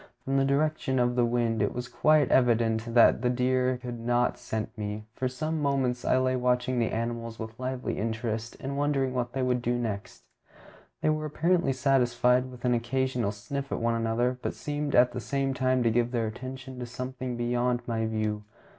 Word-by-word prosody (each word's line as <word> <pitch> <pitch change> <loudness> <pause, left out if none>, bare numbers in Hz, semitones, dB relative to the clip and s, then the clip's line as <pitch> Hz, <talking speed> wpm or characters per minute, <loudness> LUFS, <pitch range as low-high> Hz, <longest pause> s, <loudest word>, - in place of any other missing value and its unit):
From 135 +1 +1
the 135 - +3
direction 140 -1 +1
of 120 0 +2
the 120 -1 +3
wind 115 -2 0
it - - 0
was 125 0 -4
quite 155 -1 +3
evident 115 -2 +2
that 115 -1 +6
the 125 - +2
deer 125 0 +1
could 120 -1 -6
not 120 +1 +1
scent 110 -1 -4
me, 105 0 -4
so - - -23
for 130 - +1
some 155 +5 -3
moments 130 -4 0
I - - +3
lay 130 0 +2
watching 125 0 +1
the 115 - +1
animals 115 0 -3
with 110 +1 -7
lively 130 0 -3
interest, 110 +1 -3
and 140 -1 -4
wondering 140 -3 +1
what 125 -1 -2
they 135 -1 -1
would 125 -1 +1
do 120 0 0
next. 105 - -4 0.8
They 155 - +3
were 155 0 -1
apparently 170 +1 +1
satisfied 125 -1 +2
with 125 -1 -9
an 125 - +3
occasional 120 -1 0
sniff 140 +7 -5
at - - -1
one 115 0 +1
another, 115 +2 0
but - - -3
seemed 145 -1 -2
at 125 0 +6
the 125 - -5
same 135 +2 -1
time 130 -1 +1
to 115 - +3
give 120 +1 +2
their 120 -2 -1
attention 130 +3 -7
to 125 - -5
something 125 0 -5
beyond 120 +1 0
my 115 -2 -1
view. 110 -1 -2
125 Hz, 200 wpm, -28 LUFS, 115-130 Hz, 0.8 s, that